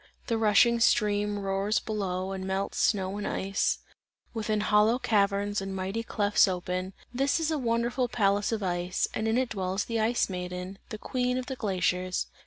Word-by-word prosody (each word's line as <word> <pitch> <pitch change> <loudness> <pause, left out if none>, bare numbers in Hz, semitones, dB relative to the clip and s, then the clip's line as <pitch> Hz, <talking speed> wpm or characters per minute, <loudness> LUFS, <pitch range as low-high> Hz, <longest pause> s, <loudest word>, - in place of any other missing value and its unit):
The 230 - 0
rushing 230 +2 +4
stream 210 -2 +2
roars 195 +1 0
below 190 -3 -2
and 190 -1 -4
melts 190 +1 -2
snow 195 -2 +1
and 205 - -3
ice; 195 +1 0 0.6
within, 215 -2 -1
hollow 210 +3 +4
caverns 205 -3 +1
and 195 0 -5
mighty 190 +4 -2
clefts 205 -2 +3
open, 185 0 -3 0.2
this 275 +6 +1
is 325 0 0
a 310 - 0
wonderful 240 +1 0
palace 205 -3 +1
of 220 -2 -2
ice, 180 0 0
and 220 - -1
in 225 +2 +2
it 255 -1 +1
dwells 190 0 -2
the 230 -1 -2
Ice 230 +2 +2
Maiden, 180 +1 -5
the 215 - -5
Queen 250 +3 -1
of 255 - -3
the 265 - -5
glaciers. 185 -4 0
205 Hz, 175 wpm, -28 LUFS, 190-230 Hz, 0.6 s, rushing